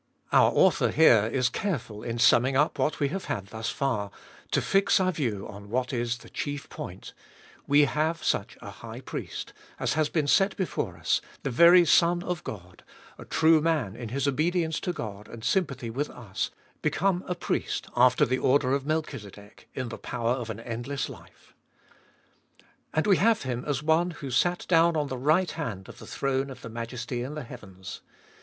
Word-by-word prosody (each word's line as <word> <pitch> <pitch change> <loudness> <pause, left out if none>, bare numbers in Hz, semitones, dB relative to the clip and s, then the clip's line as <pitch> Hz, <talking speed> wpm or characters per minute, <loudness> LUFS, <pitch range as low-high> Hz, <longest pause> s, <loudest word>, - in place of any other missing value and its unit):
Our - - +6
author - - +4
here 115 -9 +5
is 130 -1 +2
careful 150 - -3
in 115 +1 -4
summing 125 +3 +4
up 150 +3 +2
what 155 - 0
we 140 - +1
have 190 +5 -4
had 100 -4 -4
thus 110 +1 -4
far, 120 -7 -1 0.4
to - - +2
fix 195 0 +3
our 185 -1 +2
view 120 - -2
on 100 0 -10
what 125 +3 -1
is 120 -1 -1
the - - -15
chief 145 -1 -4
point - - -8 0.3
— - - -25
We 145 +1 +5
have 155 +4 -1
such - - -1
a - - -7
High - - -9
Priest, - - -6 0.3
as - - 0
has 155 -1 +1
been 155 -3 0
set 195 +7 +3
before 110 - -2
us, 80 0 +1 0.2
the 135 - -2
very 170 +7 +7
Son 175 +2 +4
of 180 -3 -3
God, 90 -3 -9 0.4
a - - -9
true 160 -1 +4
Man 150 -11 0
in 120 -1 -6
His 135 +3 -1
obedience 160 +3 0
to 180 - -2
God 105 - -7
and 115 -1 -10
sympathy 130 -4 0
with 140 +5 -2
us, 115 -6 -4 0.3
become 190 0 +1
a 180 - -2
Priest 175 - -2
after 125 +1 +5
the 130 +2 0
order 130 0 +3
of 140 0 -1
Melchizedek, 110 -10 -5
in 130 -2 -3
the - - -7
power 120 -1 -2
of 120 -2 -2
an 110 0 -5
endless 120 +4 -4
life. - - -15 1.4
And 155 - 0
we 195 -4 +5
have 225 +2 +3
Him 125 -2 -3
as 145 -1 -1
one 160 +3 +3
who 140 -5 -7
sat 175 +8 +1
down 165 -1 +4
on 145 -2 -1
the 130 - -3
right 155 +7 +2
hand 110 - -5
of - - -12
the - - -11
throne 135 0 -1
of 130 -2 -10
the - - -7
Majesty 120 +2 -5
in 135 +5 -5
the 150 - -5
heavens. 95 -5 -10
135 Hz, 190 wpm, -27 LUFS, 115-160 Hz, 1.4 s, very